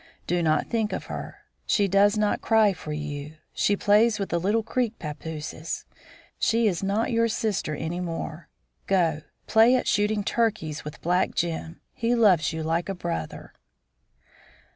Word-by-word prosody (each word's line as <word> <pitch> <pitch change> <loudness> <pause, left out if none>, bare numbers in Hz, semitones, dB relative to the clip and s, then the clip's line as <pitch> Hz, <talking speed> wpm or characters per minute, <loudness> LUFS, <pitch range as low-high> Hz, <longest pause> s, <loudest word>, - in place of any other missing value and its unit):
Do 175 0 0
not 155 -2 +2
think 220 -2 -1
of - - -4
her. - - -7 0.3
She 205 -3 +3
does 200 +2 +4
not 210 -1 +1
cry 220 -3 +4
for 155 -3 -8
you. 150 0 -5 0.2
She 205 - +2
plays 210 +2 +4
with 195 -3 -4
little 200 +6 +1
Creek 245 0 -1
pappooses. 155 +1 -6 0.5
She 230 +1 +2
is 180 -5 0
not 200 +4 0
your 230 0 +3
sister 210 -8 -1
any 165 +4 -4
more. 165 -2 -5 0.4
Go, 165 -5 +2 0.2
play 225 +3 +5
at 255 - 0
shooting 210 0 +1
turkeys 205 -10 -1
with 150 - -9
black 180 +2 +1
Jim. 165 -1 -3
He 235 +1 0
loves 190 -10 +4
you 160 0 -4
like 165 +3 -1
a 195 - -2
brother." 80 - -5
190 Hz, 155 wpm, -26 LUFS, 160-215 Hz, 0.5 s, play